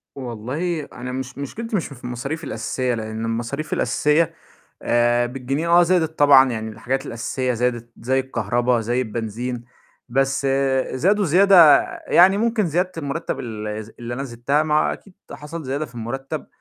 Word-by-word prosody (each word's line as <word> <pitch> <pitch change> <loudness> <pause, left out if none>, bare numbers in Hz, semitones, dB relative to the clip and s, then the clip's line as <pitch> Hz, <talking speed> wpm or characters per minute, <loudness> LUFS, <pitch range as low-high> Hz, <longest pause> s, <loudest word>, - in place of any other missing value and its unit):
والله 135 +7 -3
أنا 125 +1 -6
مش 130 +1 -6
مشكلتي 220 - -4
مش 170 - -2
في 130 -4 -13
المصاريف 135 +7 -4
الأساسية، 130 -2 -2
لإن 110 0 -4
المصاريف 120 +7 -3
الأساسية، 150 +3 +1 0.5
آآ 120 0 +2
بالجنيه 135 +6 -3
آه 175 +1 +6
زادت 165 -2 +1
طبعًا 135 -2 +7
يعني 110 -1 -4
الحاجات 130 +5 -3
الأساسية 125 +2 -2
زادت 120 0 -1
زي 130 +3 +1
الكهربا 120 -1 0
زي 120 +3 0
البنزين، 115 +2 -4 0.4
بس 135 +2 0 0.5
زادوا 195 +10 +2
زيادة 175 -3 +7 0.3
يعني 190 +3 +6
ممكن 225 -3 +1
زيادة 180 +4 0
المرتّب 160 +2 -3
الز 110 -1 -6
اللي 120 0 -5
أنا 135 - -4
زدتها 130 +5 0
ما 155 -1 0
هو 155 - +2
أكيد 195 - -12 0.2
حصل 150 +3 -7
زيادة 140 +4 -2
في 120 - -19
المرتّب، 120 +4 -5
130 Hz, 150 wpm, -22 LUFS, 120-155 Hz, 0.5 s, طبعًا